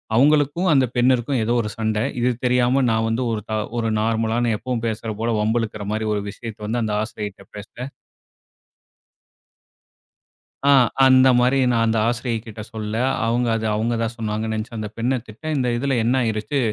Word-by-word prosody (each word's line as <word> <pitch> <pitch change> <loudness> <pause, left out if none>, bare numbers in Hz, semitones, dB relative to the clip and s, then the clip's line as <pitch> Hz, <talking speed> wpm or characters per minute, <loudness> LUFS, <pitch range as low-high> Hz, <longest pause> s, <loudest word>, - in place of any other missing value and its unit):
அவுங்களுக்கும் 145 +6 +3
அந்த 135 -3 +4
பெண்ணிற்கும் 125 +1 +2
ஏதோ 120 +2 0
ஒரு 105 - -4
சண்டை. 110 -1 -1 0.2
இது 120 +1 +2 0.2
தெரியாம, 125 +2 +3
நான் 110 0 +1
வந்து 115 +3 -1
ஒரு, 110 - -1
த - - -2 0.2
ஒரு 115 -1 0
நார்மலான, 115 +1 0
எப்பவும் 120 0 -4
பேசுற 110 0 -4
போல, 115 +1 -1
வம்பு 110 +3 +1
இழுக்கிற 105 -2 -5
மாரி 110 +1 -2
ஒரு 105 - -1
விஷயத்த 110 +1 -8
வந்து, 120 +2 -1
அந்த 105 -1 -2
ஆசிரியைட்ட 105 -3 -6
பேசுனேன். 120 +6 -8 2.8
ஆ, - - +6 0.3
அந்த 130 0 +6
மாரி, 125 +2 +3
நான் 115 -1 +2
அந்த 110 0 +1
ஆசிரியை 120 -1 -1
கிட்ட 110 -2 -9
சொல்ல, 110 -1 -4 0.3
அவுங்க 120 +1 +1
அத, 110 0 -2
அவுங்க 115 +2 0
தான் 115 +1 -1
சொன்னாங்கன்னு 110 -1 -3
நெனச்சு, 110 +2 -5
அந்த 110 -1 -4
பெண்ண 125 +3 +1
திட்ட. 110 +7 -14
இந்த 125 -2 0
இதில 135 +3 0
என்ன 120 +3 +1
ஆயிருச்சு? 110 +6 -2
115 Hz, 170 wpm, -22 LUFS, 110-125 Hz, 2.8 s, ஆ